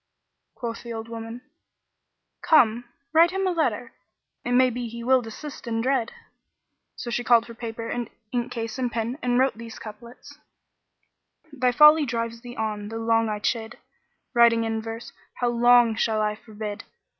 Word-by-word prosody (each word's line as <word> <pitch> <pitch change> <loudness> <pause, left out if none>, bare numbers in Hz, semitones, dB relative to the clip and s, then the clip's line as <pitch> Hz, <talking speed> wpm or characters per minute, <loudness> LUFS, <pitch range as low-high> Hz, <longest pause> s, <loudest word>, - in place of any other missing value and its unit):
Quoth 230 -1 -5
the 235 - -8
old 225 0 -5
woman, 230 +1 -7 1.0
"Come, 240 -6 +4 0.3
write 330 +2 +6
him 385 +1 -2
a 370 - +2
letter; 335 -2 -1 0.5
it 245 - -2
may 255 0 +5
be 245 0 -4
he 235 +1 -7
will 260 +1 +4
desist 245 +4 -9
in 225 -1 -1
dread." 245 -1 0 0.8
So 240 - -6
she 240 +1 -1
called 235 -1 +5
for 235 - -10
paper 230 -1 -6
and 240 -2 -3 0.2
ink 245 0 -2
case 230 +1 -4
and 250 -2 -1
pen 235 +4 -3
and 245 -1 +1
wrote 255 -3 +2
these 230 -1 -9
couplets, 230 +3 -12 1.1
"Thy 255 -3 +2
folly 300 +3 +7
drives 230 -1 -3
thee 245 0 -9
on 210 -2 -3
though 225 - -5
long 225 0 +2
I 210 - -2
chid, 225 +1 -2 0.3
* - - -49
Writing 235 -1 +5
in 225 0 -2
verse: 225 +1 -7 0.2
how 245 - 0
long 240 -1 +5
shall 220 0 0
I 210 0 +1
forbid? 210 -1 -7
235 Hz, 170 wpm, -25 LUFS, 225-245 Hz, 1.1 s, folly